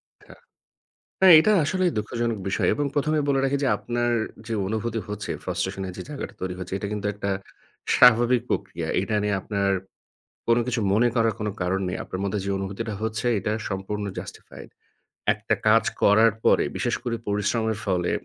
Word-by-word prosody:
আচ্ছা - - -19 0.9
হ্যাঁ, 185 -3 +9
এটা 215 +6 +3
আসলেই 185 +2 +1
দুঃখজনক 115 +1 -2
বিষয় 95 - +1
এবং 145 - -1
প্রথমেই 150 0 +1
বলে 135 -1 +2
রাখি 140 +1 +1
যে 130 - +2
আপনার 120 0 -1 0.4
যে 115 - -2
অনুভূতি 110 +1 -2
হচ্ছে 105 0 -5
frustration 95 - -3
-এর 90 - -6
যে - - -4
জায়গাটা 145 - -6
তৈরি 90 -1 -2
হচ্ছে 90 +1 -5
এটা 100 - -4
কিন্তু 105 -1 -3
একটা 100 0 -3 0.7
স্বাভাবিক 120 +1 +6
প্রক্রিয়া। 85 -5 -2
এটা 105 +2 -1
নিয়ে 100 -1 +1
আপনার 100 -2 0 0.8
কোন 115 - +5
কিছু 120 -2 -1
মনে 115 +4 +4
করার 115 -2 +2
কোন 105 - -1
কারণ 95 +2 0
নেই। 90 - -2
আপনার 95 - -6
মধ্যে 100 +1 -1
যে 100 - -2
অনুভূতিটা 100 +3 -4
হচ্ছে 110 +1 -2
এটা 105 +2 -2 0.2
সম্পূর্ণ 100 +2 -3
justified - - -10 0.6
একটা - - -1
কাজ 115 +1 +5 0.2
করার 110 +2 +6
পরে - - +4
বিশেষ - - 0
করে 120 -2 -1
পরিশ্রমের 105 +2 0
ফলে 90 -3 0
110 Hz, 170 wpm, -25 LUFS, 100-120 Hz, 0.9 s, হ্যাঁ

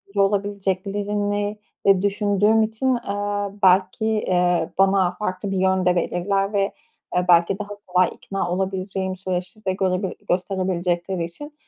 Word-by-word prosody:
olabileceklerini, 205 +1 0 0.3
eee, 195 -2 +5
düşündüğüm 205 +2 +2
için, 235 +4 0
eee, 205 -2 -2
belki, 185 +3 +4
eee, 180 -6 +1
bana 195 -2 +4
farklı 195 -1 -3
bir 190 - -1
yön 190 0 +2
de 180 0 +3
belirler 195 +4 0
ve, 200 - +2 0.5
eee, 180 - +2
belki 175 +3 +4
daha 205 0 -5 0.2
kolay 180 0 +3
ikna 195 -3 -4
olabileceğim 190 0 -2
süreçleri 185 +2 -5
de 190 - +1
görebil 185 0 0 0.2
gösterebilecekleri 180 -1 -1
için 290 - -8
195 Hz, 130 wpm, -22 LUFS, 185-205 Hz, 0.5 s, eee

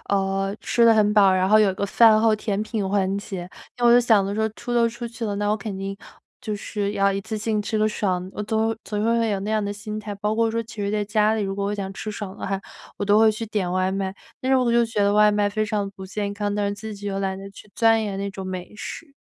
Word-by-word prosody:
呃， 195 0 0
吃 235 - +2
得 230 -1 +7
很 210 -1 +3
饱。 200 -3 +6
然 185 0 +2
后 215 +2 +6
有 205 -3 +4
个 200 - -2
饭 220 +1 +6
后 220 -1 +4
甜 210 -1 -2
品 215 -2 -2
环 195 -1 +1
节， 190 -4 -6 0.3
那 240 - 0
我 235 - +7
就 245 - +7
想 220 -5 +4
着 200 - -3
说 220 +1 +1
出 240 +3 -5
都 235 -1 +4
出 235 +1 -6
去 230 0 -6
了， 205 -2 -2
那 205 0 -1
我 215 - +2
肯 205 -1 -6
定 195 0 -4 0.4
就 215 -3 -3
是 205 0 -3
要 200 -1 +2
一 195 - -2
次 220 +2 -5
性 215 0 -1
吃 215 +1 -2
个 215 0 +3
爽， 185 -4 -1
我 210 - -3
总 220 +1 0
会 225 - -2
总 210 -1 -3
会 230 +1 +2
会 230 - +1
有 200 -2 -1
那 205 +2 -3
样 215 -1 +1
的 205 - -2
心 210 +1 -6
态。 210 -1 -6
包 210 +2 -1
括 225 0 +2
说 230 +1 -1
其 225 0 -13
实 200 -1 -2
在 210 0 0
家 215 +1 +2
里 220 - -1
如 195 -1 -2
果 200 0 -2
我 205 - -1
想 195 -1 -4
吃 215 +2 -6
爽 205 -2 -6
的 - - -5
话， 195 0 -2 0.4
我 - - -2
都 205 +1 +4
会 220 0 +6
去 225 +1 -5
点 205 -4 -2
外 185 +1 +1
卖。 195 0 -2 0.3
但 260 - -1
是 265 - +5
我 250 -2 +2
又 235 0 +4
觉 225 -2 -2
得 200 0 +3
外 210 0 +5
卖 205 0 +1
非 215 +1 -1
常 210 -2 -2
不 195 -1 -10
健 200 +1 -3
康， 205 0 -2
但 205 -1 0
是 200 - -2
自 215 +1 -7
己 205 0 -8
又 195 -1 -2
懒 190 -1 -2
得 195 0 -8
去 200 +1 -15
钻 225 -1 +4
研 200 -2 -3
那 200 0 -3
种 190 -1 -7
美 185 +1 -6
食。 290 +7 -8
210 Hz, 315 characters per minute, -23 LUFS, 195-220 Hz, 0.4 s, 得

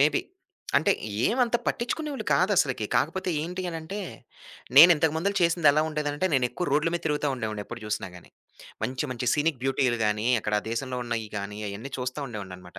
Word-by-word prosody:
Maybe 145 +1 +4 0.6
అంటే 140 - +4 0.3
ఏమంత 240 0 +2
పట్టించుకునేవాళ్లు 285 +4 -2
కాదసలుకి. - - +2
కాకపోతే 190 -1 0
ఏంటి 180 +3 -4
అనంటే 165 +5 -6 0.8
నేను 165 +5 +11
ఇంతకు 155 0 +2
ముందు 200 +5 0
చేసిందెలా 155 -3 +4
ఉండేదంటే 150 +2 -1
నేను 125 -2 +3
ఎక్కువ 180 - -3
రోడ్ల 150 +3 +3
మీద 175 - -1
తిరుగుతూ 150 -1 0
ఉండేవాడిని. 110 -4 -4
ఎప్పుడు 115 0 -9
చూసినా 105 -2 -3
గానీ. 90 - -15 0.5
మంచి, 130 +2 -2
మంచి 125 0 -4
సీనిక్ 150 -3 0
బ్యూటీలు 130 -3 +1
గానీ 105 +1 0
అక్కడా 105 0 0
దేశంలో 125 +2 -3
ఉన్నాయి 115 -2 -3
గానీ, 105 +1 -6
అయన్నీ 110 +7 -7
చూస్తా 125 +3 -3
ఉండేవాడిననమాట. 95 -4 -9
140 Hz, 160 wpm, -26 LUFS, 115-165 Hz, 0.8 s, నేను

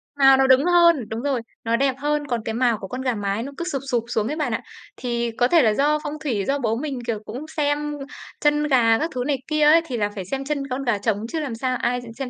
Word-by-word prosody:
Mào 270 -1 +6
nó 265 - +3
đứng 265 +4 +5
hơn, 340 -9 +4
đúng 225 +1 -4
rồi, 270 -4 -1 0.2
nó 230 0 +1
đẹp 270 +1 +1
hơn. 295 +1 -1
Còn 240 -2 -1
cái 225 - -2
mào 240 -3 +2
của 195 - -8
con 255 +4 -5
gà 255 -3 0
mái 205 +2 -2
nó 280 - -6
cứ 340 - -3
sụp 275 -2 -2
sụp 235 -2 +1
xuống 225 -2 -1
ấy 300 - -2
bạn 305 - -1
ạ. - - -2 0.4
Thì 235 -1 -2
có 245 - +4
thể 330 +3 +5
là 220 -3 +3
do 295 +5 +2
phong 295 - -4
thủy, 220 -10 -1
do 280 +1 +1
bố 225 -3 0
mình, 270 0 -4
kiểu, 225 -3 -1
cũng 255 +9 -7
xem 295 0 0 0.5
chân 295 0 +3
gà 230 -5 +4
các 320 +2 -1
thứ 250 - -1
này 280 -2 +1
kia 305 0 0
ấy, 310 +3 +6
thì 255 -6 -4
là 205 -2 0
phải 190 - -5
xem 270 +8 -4
chân 280 -2 -2
con 260 +2 -3
gà 235 -4 +1
trống 210 +1 -1
chứ 320 +5 -3
làm 270 -7 -4
sao 255 +1 -1
ai 245 +1 0 0.2
xem 270 -2 -4
260 Hz, 280 wpm, -23 LUFS, 230-290 Hz, 0.5 s, Mào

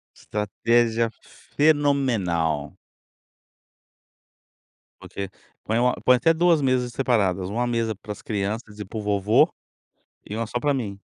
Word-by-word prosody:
Estratégia 115 +2 0 0.5
fenomenal. 115 - +1 2.2
Porque 100 -1 -6 0.3
põe 110 +2 0
uma 125 +1 +3
põe 125 0 +6
até 165 +6 +3
2 170 -1 +3
mesas 130 -2 +1
separadas, 100 -9 +1
1 120 +4 -1
mesa 115 -2 -1
para 105 +2 -9
as 105 - -8
crianças 105 +1 -4
e 105 - -5
para 105 - -8
o - - -4
vovô, 105 0 +3 0.8
e 105 - -4
1 115 +1 -2
só 120 - -3
pra 145 +2 +1
mim. 110 -7 -3
115 Hz, 130 wpm, -24 LUFS, 100-125 Hz, 2.2 s, põe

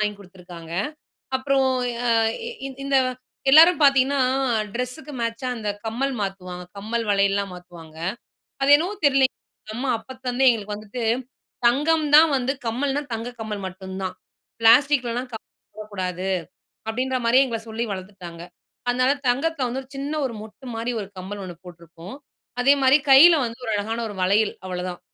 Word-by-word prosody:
வாங்கி 210 -1 0
கொடுத்துருக்காங்க. 180 -3 -12 0.6
அப்புறம் 265 0 +2 0.4
அ - - +2 0.4
இ 470 - -6 0.2
இந்த 275 0 0 0.6
எல்லாரும் 325 +4 +8
பாத்தீங்கன்னா, 275 0 +4 0.5
ட்ரெஸுக்கு 250 +5 -5
மேட்சா 230 +2 -2
அந்த 215 -2 -5 0.2
கம்மல் 260 +5 -1
மாத்துவாங்க, 185 -2 -5
கம்மல் 225 +3 -2
வளையல்லலாம் 200 -1 +1
மாத்துவாங்க. 175 -3 -13 0.7
அது 270 - +2
என்னவோ 345 +7 -1
தெரியலங்க. 270 -2 +3 0.4
அம்மா 260 +3 -2
அப்பத்துலருந்தே 260 +2 -1
எங்களுக்கு 210 -3 -4
வந்துட்டு 215 +3 -6 0.6
தங்கம் 300 +5 +2
தான் 320 +2 +8
வந்து 260 +1 -1
கம்மல்னா 270 +5 -1
தங்க 225 +2 -4
கம்மல் 215 -2 -4
மட்டும் 190 0 -9
தான். 185 -1 -4 0.5
பிளாஸ்டிக்லலாம் 245 +1 +4
கம்மல் 220 - -12
போடக்கூடாது. 190 -3 -4 0.6
அப்பிடின்ற 255 +3 -1
மாரியே 255 +4 +5
எங்கள 230 -2 -3
சொல்லி 225 +1 -3
வளர்த்துட்டாங்க. 185 -3 -8 0.5
அதனால 255 +2 +3 0.2
தங்கத்தில 280 +2 0
வந்து 260 +3 -3
ஒரு 260 - -24
சின்ன 280 +2 -3
ஒரு 250 - -3
மொட்டுமாரி 230 +1 -6
ஒரு 200 - -7
கம்மல் 200 +2 -6
ஒண்ணு 180 -2 -8
போட்டிருப்போம். 170 +3 -11 0.5
அதேமாதிரி 275 +1 +5
கையில 325 +6 +9
வந்து 230 +1 -7
ஒரு 225 - -2
அழகான 220 +3 -2
ஒரு 205 - -8
வளையல் 205 +3 +2
அவளதான். 180 -1 -4
230 Hz, 140 wpm, -23 LUFS, 200-265 Hz, 0.7 s, கையில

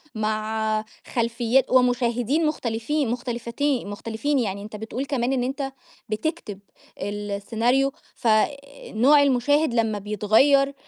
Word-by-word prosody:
مع 215 0 -1 0.3
خلفيات 235 +2 +1
ومشاهدين 250 +3 +2
مختلفين 260 -1 -1
مختلفتين 240 +1 -2
مختلفين، 230 +7 -2
يعني 200 -3 -2
أنت 215 0 -9
بتقول 225 +5 -4
كمان 265 -2 0
إن 250 -2 0
أنت 270 +1 -3 0.4
بتكتب 215 - -3 0.4
السيناريو 215 +6 0 0.2
ف 235 - -3
آآ 215 +3 +4 0.4
نوع 280 +6 +5
المشاهد 285 +1 +2
لمّا 220 -3 +1
بيتغيّر، 220 +8 +3
235 Hz, 110 wpm, -24 LUFS, 215-270 Hz, 0.4 s, نوع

